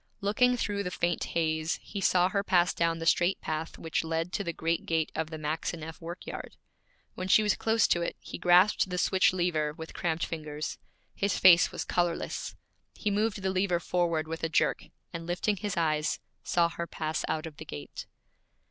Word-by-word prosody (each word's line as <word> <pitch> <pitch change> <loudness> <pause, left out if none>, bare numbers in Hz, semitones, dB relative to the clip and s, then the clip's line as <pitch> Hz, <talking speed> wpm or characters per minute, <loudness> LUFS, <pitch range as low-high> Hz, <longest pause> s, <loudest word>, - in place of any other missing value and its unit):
Looking 245 +5 +3
through 205 -3 -1
the 190 - -2
faint 175 -1 -1
haze, 160 -1 0
he 200 - -6
saw 180 -1 +4
her 200 0 0
pass 180 -3 +3
down 165 -1 +1
the 165 - -5
straight 175 +3 +3
path 160 +1 -4
which 165 0 -2
led 165 +2 -2
to 200 - -1
the 170 - -2
great 165 +1 -2
gate 160 -1 0
of 160 -1 -2
the 160 - -6
Maxineff 160 +1 -4
work 170 +2 -7
yard. - - -7 0.6
When 185 - -5
she 215 +3 +5
was 210 - +2
close 225 0 +2
to 175 - +2
it 170 - -2
he - - -8
grasped 180 +3 +5
the 180 - -3
switch 185 +1 +3
lever 170 -5 0
with 160 +1 -9
cramped 160 -2 -1
fingers. 155 -2 -5 0.3
His 200 -1 0
face 175 -2 +7
was - - -4
colorless. 175 -1 -1 0.4
He 210 - -1
moved 210 -1 0
the 190 - +1
lever 185 -2 +1
forward 170 -3 0
with 165 0 -5
a 165 - +1
jerk, 155 - +1 0.3
and 165 0 -6
lifting 190 +4 0
his 205 -2 -3
eyes, 155 -2 +1 0.2
saw 170 -1 +3
her 170 0 -5
pass 155 -1 -3
out 155 +1 -2
of 155 -3 -9
the 155 - -7
gate. 75 - -8
170 Hz, 195 wpm, -29 LUFS, 160-190 Hz, 0.6 s, face